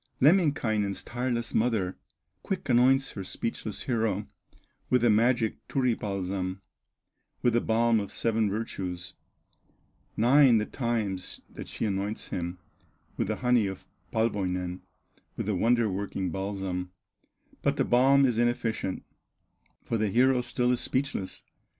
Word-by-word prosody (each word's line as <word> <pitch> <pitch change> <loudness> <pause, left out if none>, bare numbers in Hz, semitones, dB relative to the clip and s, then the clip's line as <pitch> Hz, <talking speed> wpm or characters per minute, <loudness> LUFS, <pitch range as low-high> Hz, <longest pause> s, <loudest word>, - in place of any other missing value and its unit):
Lemminkainen's 125 - +2
tireless 120 -1 -2
mother 110 -6 +1 0.5
Quick 190 -6 -3
anoints 130 +2 +4
her 100 - -6
speechless 110 +2 -4
hero, 110 -5 0 0.6
With 125 -2 +3
the 120 - +5
magic 115 +1 +2
Turi 130 -3 +1
balsam, 95 -2 -3 0.8
With 120 - +3
the 120 - +3
balm 115 0 +3
of 100 - -5
seven 110 -2 +1
virtues; 90 -4 -4 1.0
Nine 125 +1 +6
the 105 - +1
times 110 -8 -2
that - - -8
she - - -3
anoints 100 +1 -2
him 85 0 -3 0.6
With - - -1
the - - -1
honey 120 -4 +4
of 95 -1 -7 0.2
Palwoinen, 90 -5 -1 0.6
With - - -2
the 105 - 0
wonder 115 +4 +3
working 95 -1 -3
balsam; 95 -2 -3 0.7
But - - +1
the - - +2
balm 135 +3 +5
is 120 -3 +1
inefficient, 120 -5 -1 0.8
For 115 - -1
the 110 -1 +1
hero 125 +4 +4
still 125 0 0
is 125 - +1
speechless. 130 -8 -2
110 Hz, 130 wpm, -28 LUFS, 95-120 Hz, 1.0 s, Nine